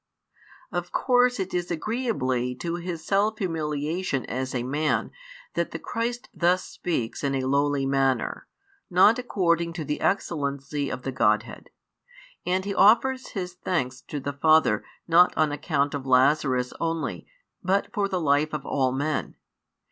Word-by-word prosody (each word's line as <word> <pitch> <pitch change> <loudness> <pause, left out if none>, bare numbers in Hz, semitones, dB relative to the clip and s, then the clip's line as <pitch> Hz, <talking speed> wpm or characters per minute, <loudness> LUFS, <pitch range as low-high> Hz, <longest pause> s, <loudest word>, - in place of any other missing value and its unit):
Of 175 -1 -3
course 250 -2 +3
it 190 0 -3
is 175 -1 -1
agreeably 155 - -1
to 170 +5 -3
His 170 -2 -5
self 210 +2 +1
humiliation 155 - -2
as 130 +2 -3
a 120 - -1
Man 145 +5 0 0.4
that - - -1
the - - -5
Christ 240 +1 -3
thus 180 +2 +2
speaks 125 -10 -3
in 140 -1 0
a 130 - -1
lowly 140 +1 +1
manner, 135 -1 0 0.4
not 200 +6 +5
according 170 -8 0
to 160 -2 -5
the 150 +1 -3
excellency 140 -6 -1
of 125 - -5
the 135 - -2
Godhead: 105 -2 0 0.8
and 185 +1 +1
He 200 - -2
offers 250 +7 +4
His 180 -2 -3
thanks 135 -8 -2
to 145 - -4
the 145 +1 -4
Father 155 -7 +3 0.2
not 175 +2 +5
on 155 -2 +3
account 145 -1 0
of 135 -2 -4
Lazarus 130 -1 +3
only, 165 -1 -3 0.4
but 195 +4 0
for 205 -3 +1
the 190 -2 -1
life 150 0 +2
of 145 -2 -5
all 130 -2 +1
men. 145 +3 -2
155 Hz, 150 wpm, -26 LUFS, 135-185 Hz, 0.8 s, not